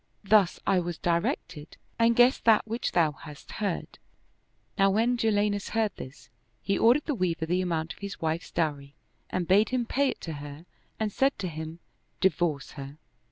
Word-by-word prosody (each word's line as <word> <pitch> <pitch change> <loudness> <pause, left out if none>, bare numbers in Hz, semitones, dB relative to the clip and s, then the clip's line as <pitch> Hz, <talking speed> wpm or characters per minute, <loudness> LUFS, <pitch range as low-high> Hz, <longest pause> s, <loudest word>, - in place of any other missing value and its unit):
Thus 200 -3 +4
I 190 - +3
was 175 -1 -4
directed 170 -3 -2 0.2
and 230 0 +4
guessed 245 +2 +4
that 225 -2 +5
which 230 +2 -3
thou 165 -3 +3
hast 150 0 -12
heard." 200 -4 -3 0.8
Now 195 -1 +4
when 225 +5 +2
Jalinus 205 -3 0
heard 220 -3 0
this, 130 - -11 0.3
he 195 - +1
ordered 245 +6 +4
the 300 - -1
Weaver 175 -7 -1
the 180 +3 0
amount 165 -2 -2
of - - -21
his 200 0 -5
48 - - -27
Viiakha - - -11 0.2
wife's - - -14
dowry 145 -4 -2 0.3
and 180 -2 -2
bade 205 +4 +4
him 250 -2 0
pay 275 +3 +1
it - - -6
to 165 - -5
her 145 +3 -9 0.3
and 215 -2 -1
said 270 +1 +2
to 185 - -3
him, 160 +1 -7 0.2
" - - -44
Divorce 170 -6 0
her." 140 0 -9
185 Hz, 190 wpm, -28 LUFS, 160-220 Hz, 0.8 s, that